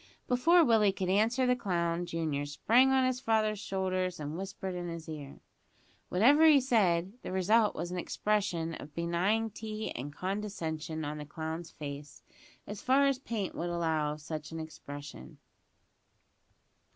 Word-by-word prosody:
Before 330 +7 +5
Willie 220 -5 +4
could 190 -1 -3
answer 225 +6 +3
the 250 0 +3
clown 175 -6 -1
junior 155 -4 -2
sprang 235 - +4
on 265 -1 +3
his 255 -1 0
father's 215 -4 +1
shoulders, 185 -3 -2
and 150 +1 -4
whispered 190 0 -5
in 175 -1 -4
his 170 -1 -6
ear. 150 -3 -8 0.7
Whatever 280 - +6
he 300 -3 +7
said, 195 -8 +2
the - - -6
result 210 +4 +3
was 175 - -4
an 180 - -2
expression 175 -5 -1
of 150 -1 -9
benignity 215 +5 -1
and 140 +4 -5
condescension 165 -4 -4
on 150 +1 -4
the 150 - -6
clown's 160 +2 -5
face 145 -1 -8 0.4
as 205 0 -7
far 270 +2 +4
as 275 -2 +2
paint 225 -7 -3
would 175 - -3
allow 160 -3 0
of 150 - -10
such 155 0 -6
expression. 155 -1 -8
185 Hz, 150 wpm, -31 LUFS, 160-220 Hz, 0.7 s, he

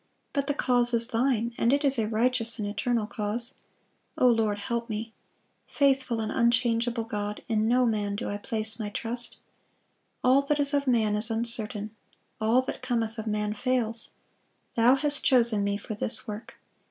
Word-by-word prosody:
But 280 -2 -1
the 285 - 0
cause 245 -3 +2
is 230 +1 -1
Thine,... 235 -1 0
and 235 - +3
it 285 +1 +2
is 275 -3 +2
a 215 - 0
righteous 230 +1 +3
and 210 - -3
eternal 220 +2 -1
cause. 220 +4 -1 0.6
O - - +3
Lord, 220 -3 +2
help 235 +2 -3
me! 220 +1 -5 0.5
Faithful 265 -4 +1
and 220 - -3
unchangeable 235 0 +1
God, 210 -2 -5
in 220 -1 +1
no 250 +2 +3
man 210 -3 -1
do - - -4
I 205 - -3
place 220 +1 +1
my 210 -2 -3
trust.... 235 +3 -3 0.9
All 260 +2 +5
that 290 +1 -1
is 285 0 +2
of 280 -1 0
man 220 -4 +2
is 215 +2 0
uncertain; 220 -2 -2 0.5
all 225 +4 +3
that 260 - -6
cometh 230 -3 -2
of 220 - -5
man 210 0 -1
fails.... 230 -1 -1 0.6
Thou 240 +3 +5
hast 290 0 0
chosen 235 -5 +3
me 200 0 0
for 215 - -7
this 235 +4 +1
work.... 210 +2 -7
230 Hz, 175 wpm, -27 LUFS, 215-250 Hz, 0.9 s, All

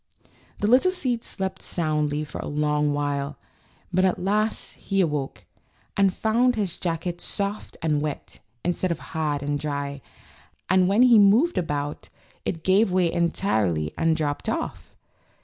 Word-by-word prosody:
The - - +1
little 255 +10 +5
seed 255 -10 0
slept 190 -1 -4
souiidly 150 -2 -1
for - - -8
a - - -5
long 150 0 +1
while, 145 0 -2 0.6
but 185 +1 +3
at 185 -1 +2
last 210 +4 -1
he 195 -1 -2
awoke, 150 -6 -1 0.5
and 195 -1 +4
found 235 +5 +2
his 200 -5 -2
jacket 170 0 -3
soft 200 +1 -3
and 150 -2 +1
wet, 150 -1 -5 0.3
instead 180 +1 0
of 170 - -1 0.2
hard 150 -3 -1
and 145 0 -1
dry, 140 -1 -3 0.7
and 185 0 +4
when 205 +6 +4
he 240 -3 +7
moved 225 - +5
about 145 -3 -3 0.4
it 165 -3 -3
gave 195 +2 +3
way 180 -2 +2
en 170 0 +2
tirely 90 - 0
and 165 -1 +2
dropped 145 -2 -2
off. - - -4
170 Hz, 150 wpm, -25 LUFS, 150-200 Hz, 0.7 s, he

